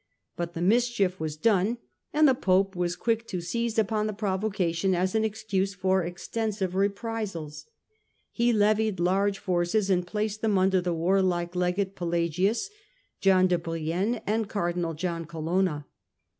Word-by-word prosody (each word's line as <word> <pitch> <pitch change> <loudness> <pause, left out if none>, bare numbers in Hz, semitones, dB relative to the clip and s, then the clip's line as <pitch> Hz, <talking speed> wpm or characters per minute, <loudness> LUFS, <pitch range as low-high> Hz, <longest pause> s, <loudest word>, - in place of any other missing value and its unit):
But 170 0 -4
the 170 - -2
mischief 210 -3 +2
was 155 -1 -4
done 210 +4 +2 0.3
and 305 0 +5
the 265 - +5
Pope 195 -3 +1
was 175 0 -1
quick 230 +3 -1
to 185 - -3
seize 230 +6 -2
upon 215 0 +1
the 215 - -3
provocation 190 -3 0
as 185 +1 0
an 220 0 +2
excuse 200 -3 -1
for 190 -1 +1
extensive 190 +2 -3
reprisals. 195 -6 -3 0.6
He 240 0 +2
levied 215 -2 +2
large 195 +3 +2
forces 190 +1 0
and 180 -1 +1
placed 215 +2 -2
them 215 -3 +2
under 190 0 +3
the 175 0 -1
warlike 175 0 +1
Legate 180 +2 0
Pelagius, 175 - 0 0.5
John 190 -1 +4
de 180 -2 +2
Brienne 170 +7 -2
and 215 0 0
Cardinal 175 -4 -1
John 170 0 -3
Colonna. 165 -1 -1
190 Hz, 145 wpm, -27 LUFS, 175-215 Hz, 0.6 s, and